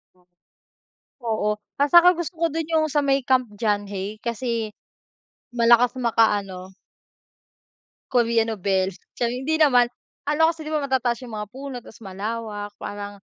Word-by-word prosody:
Oh. 180 -1 -30 1.0
Oo. 215 -1 +1 0.3
At 285 - +3
saka 345 +1 +9
gusto 345 +1 -4
ko - - +4
do'n, 325 -1 -2
yung 315 -1 +3
sa 295 - +3
may 275 -2 +1
Camp 255 -2 +2
John 205 -2 0
Hay 205 +2 -5
kasi, 235 -2 -2 0.9
malakas 235 +1 +5
makaano 205 -6 0 1.4
Korea 235 -2 +3
nobela, 195 -3 0 0.2
charing, 245 +2 -2
hindi 315 +2 +1
naman. 250 -6 +5 0.4
Ano 310 +2 +4
kasi, 320 -1 -10
'di 305 - -6
ba, 300 -2 0
matataas 255 -3 0
yung 235 -3 -7
mga 210 -1 -4
puno, 270 0 -7
tas 210 - -15
malawak. 205 +1 -5
Parang 205 0 -7
235 Hz, 145 wpm, -23 LUFS, 205-270 Hz, 1.4 s, saka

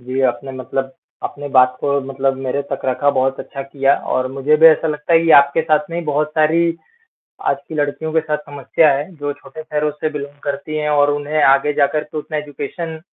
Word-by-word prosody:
जी, 130 +2 -3
आपने 135 +1 -1
मतलब 130 +1 -4 0.3
अपने 145 0 -5
बात 130 -2 +4
को 140 0 +1
मतलब 135 0 0
मेरे 140 +2 -1
तक 140 - -3
रखा, 130 +2 +2
बहुत 135 -1 0
अच्छा 140 - -7
किया। 135 0 +1 0.2
और 130 0 0
मुझे 140 +3 +2
भी 160 +1 +7
ऐसा 160 0 +5
लगता 150 +2 -2
है - - +8
कि 165 - +2
आपके 140 +3 0
साथ 155 -1 +1
में 170 0 -3
बहुत 150 0 0
सारी 165 +2 +3 0.7
आज 140 - +1
की 160 - -6
लड़कियों 150 +2 -2
के 160 - +4
साथ 155 -1 -2
समस्या 145 +1 +1
है, 145 +4 -3
जो 145 -1 -4
छोटे 140 +2 -11
शहरों 150 -1 -1
से 150 +1 -3
बिलोंग 145 -1 -7
करती 145 +2 -4
है 150 0 -1
और 145 -1 +3
उन्हें 145 +1 -1
आगे 135 +2 +4
जाकर 150 +1 +1
तो - - -5
उतना 155 +1 -5
एजुकेशन 150 +3 -6
145 Hz, 210 wpm, -18 LUFS, 135-155 Hz, 0.7 s, है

